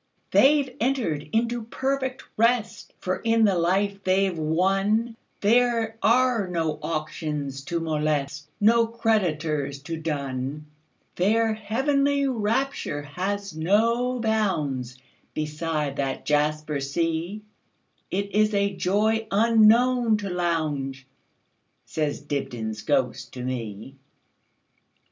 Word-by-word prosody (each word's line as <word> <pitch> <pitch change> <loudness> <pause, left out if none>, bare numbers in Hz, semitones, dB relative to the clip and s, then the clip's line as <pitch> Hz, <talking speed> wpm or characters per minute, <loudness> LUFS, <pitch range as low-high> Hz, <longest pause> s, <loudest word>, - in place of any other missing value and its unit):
"They 285 +2 +5
've 260 -2 -13
entered 220 - -1
into 235 +1 0
perfect 265 +2 -2
rest; 230 0 +1
For 185 0 -2
in 225 -1 +3
the 200 - +3
life 195 +4 0
they 190 +1 +3
've 190 - -2
wonThere 215 +7 +1
are 240 -3 +3
no 165 -4 -2
auctions 150 -3 -3
to 170 +1 -2
molest, 150 -2 -1
No 230 +2 +4
creditors 165 - 0
to 165 +2 -4
dun. 140 -2 -3 0.5
Their 220 +4 +2
heavenly 275 +6 +1
rapture 225 - -1
has 195 +5 -4
no 230 +9 +2
boundsBeside 150 - -2
that 135 -1 -2
jasper 150 0 0
sea; 165 +8 -2 0.7
It 200 +1 -2
is 215 0 +3
a 200 -1 +1
joy 215 +4 +1
unknown 230 +2 +4
to 200 -2 -5
Lowndes,"Says 145 -2 -4
Dibdin's 120 -7 -4
ghost 130 -3 -1
to 125 - -6
me. 120 0 -5
185 Hz, 100 wpm, -25 LUFS, 150-225 Hz, 0.7 s, They